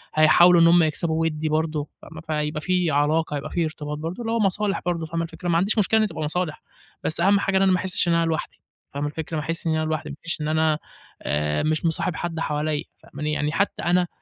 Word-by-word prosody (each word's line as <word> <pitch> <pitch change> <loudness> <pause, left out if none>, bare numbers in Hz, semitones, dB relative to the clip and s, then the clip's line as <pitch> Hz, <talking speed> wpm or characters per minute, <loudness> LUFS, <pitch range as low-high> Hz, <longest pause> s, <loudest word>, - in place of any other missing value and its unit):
هيحاولوا 170 +3 +6
إن 165 - +7
هم 170 0 +6
يكسبوا 160 +1 0
ودّي 155 -1 -1
برضه، 155 -1 -1
فاهمة، 160 0 -11
فهيبقى 150 -1 -2
في 180 -1 +1
علاقة، 150 +2 +1
هيبقى 140 - -4
في 170 -2 0
ارتباط 150 -1 -5
برضه، 165 +8 -5
اللي 225 -1 -3
هو 230 - +1
مصالح 200 0 +1
برضه 170 -2 -1
فاهمة 165 +1 -3
الفكرة، 175 +2 -6
ما 165 - +3
عنديش 195 +6 +1
مشكلة 215 +1 +3
إن 220 - +4
هي - - +1
تبقى 155 - -6
مصالح، 160 +1 -3 0.4
بس 160 - +2
أهم 200 +3 +4
حاجة 195 -1 +1
إن - - +2
أنا 195 -1 +4
ما 185 - +3
أحسِّش 185 -1 0
إن 170 - +3
أنا 170 0 +2
لوحدي، 160 -1 -3 0.3
فاهمة 145 +1 -2
الفكرة، 160 +1 -5
ما 150 - -2
أحسش 165 +1 -3
إن 160 - +2
أنا 155 0 0
لوحدي، 155 -2 -4
مش 170 -2 -3
إن 150 - -2
أنا 155 0 +2 0.4
آآ، 75 +1 -1
مش 155 +2 0
مصاحب 165 +1 0
حد 165 -1 -4
حواليّا، 150 -1 -1 0.2
فاهماني، 150 0 -4
يعني 150 0 -1
حتى 200 +5 -1
أنا 175 0 +2
160 Hz, 235 wpm, -23 LUFS, 155-175 Hz, 0.4 s, إن